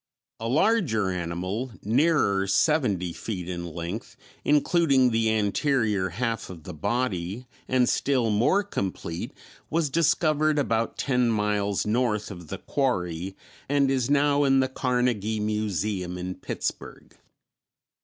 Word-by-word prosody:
A 115 - -3
larger 130 - +2
animal, 90 +7 -3
nearer 110 -5 +2
seventy 100 - +2
feet 90 -4 -5
in 85 -1 -4
length, 85 +7 -6 0.3
including 145 -3 +3
the 110 -1 +2
anterior 105 -2 +1
half 115 -1 -3
of 85 -4 -10
the 90 - -7
body, 100 +3 -2 0.2
and 130 -1 +3
still 125 -5 +1
more 120 - +3
complete, 95 - -4 0.4
was 160 -3 0
discovered 155 -1 +2
about 115 -5 0
ten 125 -3 +1
miles 105 -3 0
north 110 -1 0
of 90 -4 -9
the - - -5
quarry, 95 - -2 0.3
and 140 -1 +3
is 130 -2 0
now 145 0 +3
in 135 -1 +4
the 130 - +2
Carnegie 125 -5 0
Museum 105 -3 -2
in 90 +1 -4
Pittsburg. - - -6
110 Hz, 125 wpm, -26 LUFS, 95-135 Hz, 0.4 s, in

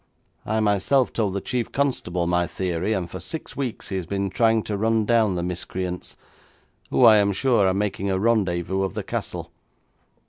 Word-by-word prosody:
I, 110 +1 +1
myself, 105 +6 +2
told 105 -4 -1
the 100 - -1
chief 120 -3 -2
constable 90 -11 -1
my 90 0 +1
theory, 90 +2 -2
and 95 -5 -1
for 95 +2 -7
six 155 - -7
weeks 130 -5 -4
he 95 - -2
has 90 -3 -4
been 100 0 -2
trying 115 +1 +3
to 105 - -3
run 110 +1 +1
down 110 -4 +3
the 85 - -2
miscreants, 90 0 -4 0.7
who, - - +4
I 110 -1 +8
am 100 -1 +3
sure, 115 -1 +2
are 95 - +2
making 100 -1 -1
a 95 - +1
rendezvous 95 -4 +1
of 95 - -2
the - - -3
castle. - - -5
100 Hz, 185 wpm, -24 LUFS, 90-110 Hz, 0.7 s, I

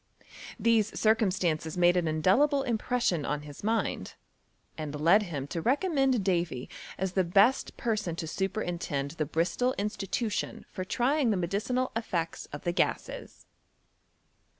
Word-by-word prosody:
These 220 -1 +2
circum 220 -1 +3
stances 160 -3 -1
made 175 0 +5
an 175 -2 +1
indelible 240 - +3
impression 235 - 0
on 150 +1 -2
his 145 +3 -11
mind, 225 +2 -1 0.6
and 150 -2 -5
led 170 +8 +5
him 155 -9 -4
to 165 - -3
recommend 270 - +2
Davy 170 -9 -1 0.3
as 190 0 -1
the 190 0 +2
best 200 +9 +3
person 215 -8 -1
to 165 - -4
superintend 175 -6 -2
the 155 -3 -3
Bristol 170 - 0
Institution 210 +1 -2
for 185 - -4
trying 255 +7 +1
the 210 - +2
medicinal 220 +9 -1
eSects 175 -7 -3
of 145 - -7
the 175 - 0
gases. 175 - -2
190 Hz, 135 wpm, -29 LUFS, 165-230 Hz, 0.6 s, made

